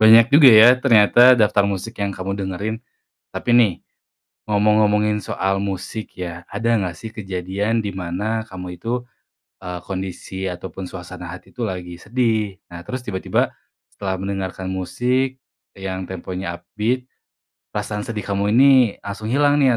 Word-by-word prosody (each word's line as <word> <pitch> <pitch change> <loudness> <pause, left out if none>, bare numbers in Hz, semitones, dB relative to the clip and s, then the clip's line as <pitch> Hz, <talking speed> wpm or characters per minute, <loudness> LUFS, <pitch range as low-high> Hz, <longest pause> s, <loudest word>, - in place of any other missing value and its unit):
Banyak 115 +4 +7
juga, 145 -3 +9
ya, 110 +1 +9
ternyata 120 0 +6
daftar 105 -2 +4
musik 100 +4 -4
yang 100 - 0
kamu 95 +1 -4
dengerin. 100 +3 -3 0.6
Tapi, - - -2
nih, 110 -7 +5 0.8
ngomong-ngomongin 105 0 +3
soal 95 +1 -1
musik, 100 +2 -5
ya, 85 -1 -6
ada 115 - -2
nggak, 90 -3 -3
sih, 110 +5 -8
kejadian 100 +2 -2
di 100 - -3
mana 100 +5 -3
kamu 90 -2 -8
itu, 120 +2 -2 0.6
eee, 90 -1 -6
kondisi 95 0 -5
atau 90 +1 -6
pun 95 -1 -6
suasana 90 -1 -8
hati, 90 - -11
tuh, 125 -2 -3
lagi 90 -2 -6
sedih, 110 -3 0
nah, 85 -1 -8
terus 130 0 -4
tiba-tiba 95 -5 -1 0.4
setelah 95 -2 -3
mendengarkan 95 -1 -4
musik 125 +8 -1 0.4
yang 95 -1 -4
temponya 90 -1 -5
upbeat, 110 +8 -2 0.7
perasaan 105 0 -3
sedih 110 -4 -4
kamu 100 +1 0
ini 135 +3 +7 0.3
langsung 100 +2 -6
hilang, 145 +1 +4
nih, 130 -3 +4
100 Hz, 145 wpm, -21 LUFS, 95-115 Hz, 0.8 s, juga